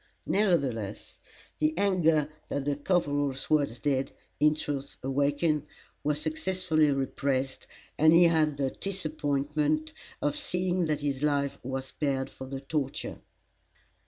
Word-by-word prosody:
Nevertheless, 135 - 0 0.4
the 155 +1 +1
anger 165 -6 +3 0.2
that 140 -1 -2
the 145 -1 +1
corporal's 145 -4 0
words 145 -6 +2
did, 135 -1 0 0.3
in 150 0 +5
truth, 140 -2 -4
awaken, 145 +3 +1 0.4
was 150 0 +1
successfully 160 0 +1
repressed, 135 -1 -1 0.3
and 155 +1 +7
he 170 +2 +7
had 155 -4 +3
the 135 -2 0
disappointment 155 -4 -1 0.3
of 145 -1 0
seeing 180 0 0
that 150 -2 -1
his 140 -2 -1
life 140 -2 +1
was 130 +1 -3
spared 135 -1 -2
for 130 - -9
the 135 0 -5
torture. 140 -1 -3
145 Hz, 125 wpm, -29 LUFS, 135-155 Hz, 0.4 s, and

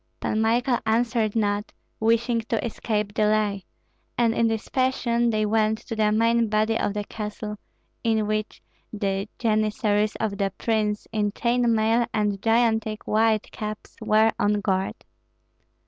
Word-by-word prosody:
Pan 215 - -1
Michael 240 +3 +2
answered 225 -1 +1
not, 205 -1 0 0.3
wishing 230 +1 +2
to 230 - 0
escape 215 -2 -2
delay; 210 -2 +1 0.5
and 235 -2 +3
in 230 0 +2
this 225 -1 -2
fashion 240 -2 +1
they 215 -1 +1
went 215 0 +2
to 225 - -7
the 215 -1 +2
main 230 +1 +2
body 215 +1 +1
of 205 -2 -1
the 210 - -1
castle, 210 0 -6 0.5
in 220 -2 +1
which 215 0 -3 0.3
the 200 -1 -2
janissaries 215 -1 +1
of 210 -2 -3
the 195 -1 0
prince, 215 -2 -1
in 210 -2 0
chain 240 0 +1
mail 225 +2 +2
and 205 -2 0
gigantic 225 -1 +1
white 220 0 +1
caps, 215 0 -7
were 220 +1 +4
on 205 - +2
guard. 195 -2 -1
215 Hz, 145 wpm, -24 LUFS, 210-230 Hz, 0.5 s, were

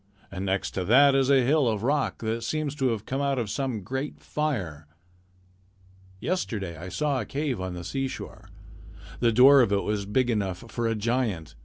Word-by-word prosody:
And 95 0 -4
next 95 +1 -1
to 95 - -3
that 135 +7 +6
is 135 -1 +2
a 135 -2 +5
hill 140 +1 +3
of 110 -2 -1
rock 145 -1 0
that 115 +1 -2
seems 150 +3 -2
to 135 -3 0
have 115 -4 -2
come 135 +2 -2
out 140 -1 0
of 115 -5 -2
some 125 -4 -2
great 130 +8 -4
fire. 95 - -3 1.3
Yesterday 110 - -3
I 85 +4 -8
saw 145 +4 -1
a - - -5
cave 140 -7 -2
on 95 -1 -4
the 90 - -6
seashore. 135 +7 -5 0.7
The 120 -1 +3
door 135 +4 +7
of 115 - +2
it 100 -1 +1
was 105 -2 -2
big 125 +4 +1
enough 100 -3 -2
for 115 +1 -2
a 115 - 0
giant. 105 - -1
120 Hz, 190 wpm, -26 LUFS, 100-135 Hz, 1.3 s, door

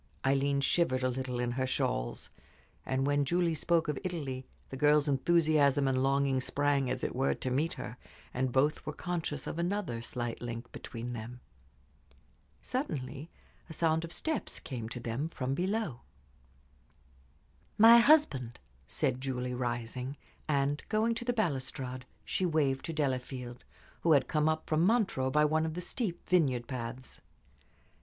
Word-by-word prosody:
Aileen 140 +1 +2
shivered 135 -3 +2
a 130 - +2
little 125 -1 -3
in 120 0 0
her 130 +1 -1
shawls, - - -2 0.6
and 130 +1 +1
when 145 0 +2
Julie 170 +3 +1
spoke 165 +2 +1
of 150 -2 -1
Italy 140 -8 -4 0.2
the - - -4
girl's 150 +2 +4
enthusiasm 145 -1 +3
and 130 -1 +2
longing 135 -1 +2
sprang, 140 0 +1
as 130 0 -2
it - - -2
were, 135 +2 +1
to 130 - -3
meet 150 +6 +1
her, 125 - -7 0.4
and 130 0 0
both 140 +4 +2
were 150 - -4
conscious 165 -5 -3
of 165 - -4
another 175 - -1
slight 120 0 -4
link 120 0 -6
between 120 +1 -6
them. 120 +2 -7 1.2
Suddenly 135 - -4 0.4
a - - -7
sound 160 0 +1
of 170 - -6
steps 315 - -3
came 115 -4 -6
to 125 - -6
them 120 +7 -3
from 130 -4 -2
below. 185 - -1 1.8
"My 230 +2 +9
husband," 230 - +4 0.3
said 130 - -1
Julie, 125 -2 -2
rising, 125 +2 -3 0.3
and, 145 0 +1
going 220 +2 +2
to 230 +1 -5
the 245 - +2
balustrade, 130 - -2 0.2
she - - -1
waved 150 -6 +1
to 165 - -4
Delafield, 130 -4 -3 0.4
who 165 - +4
had 135 -3 +4
come 155 0 +2
up 155 0 -1
from 155 0 +2
Montreux 185 - +2
by 150 +2 +4
one 155 +1 +2
of 160 0 -2
the - - -3
steep 180 0 -4
vineyard 135 -10 +2
paths. 125 0 -6
140 Hz, 155 wpm, -31 LUFS, 125-160 Hz, 1.8 s, My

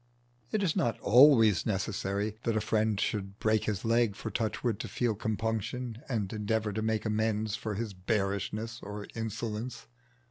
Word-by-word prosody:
It 210 -2 +1
is 170 -5 +1
not 120 - 0
always 115 - +6
necessary 100 0 -1
that 115 -3 0
a - - +3
friend 110 -1 +1
should 100 -1 -2
break 110 -1 +2
his 105 -2 -2
leg 115 -2 +3
for 110 - -5
Touchwood 110 +1 -1
to - - -4
feel 120 +2 0
compunction 110 +3 -2
and 110 -6 -1
endeavour 110 0 -1
to 110 - -2
make 110 0 0
amends 110 0 0
for 110 -2 -4
his 110 -1 -3
bearishness 100 +3 -2
or 105 0 -6
insolence. 115 +1 -4
110 Hz, 155 wpm, -30 LUFS, 105-115 Hz, -, always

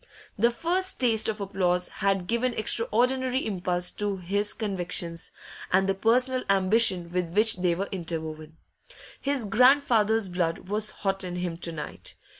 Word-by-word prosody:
The 235 +4 +3
first 355 +9 -1
taste 225 -4 +3
of 215 -1 -3
applause 185 -3 -1
had 195 -2 -1
given 235 +4 0
extraordinary 250 +4 +1
impulse 180 -3 -1
to 205 -2 -2
his 200 +3 -1
convictions, 180 -5 -3 0.4
and 190 +1 +3
the 195 - +2
personal 250 +5 +1
ambition 190 -2 +3
with 180 -1 -1
which 215 -1 +3
they 180 -2 +1
were 195 +3 -3
interwoven. 160 -3 -5 0.6
His 280 -4 0
grandfather's 225 -2 +3
blood 175 -1 -2
was 210 +2 0
hot 195 -1 -2
in 180 -1 -5
him 180 -1 -3
to 170 - -2
night. 155 -2 -7
195 Hz, 145 wpm, -26 LUFS, 180-230 Hz, 0.6 s, The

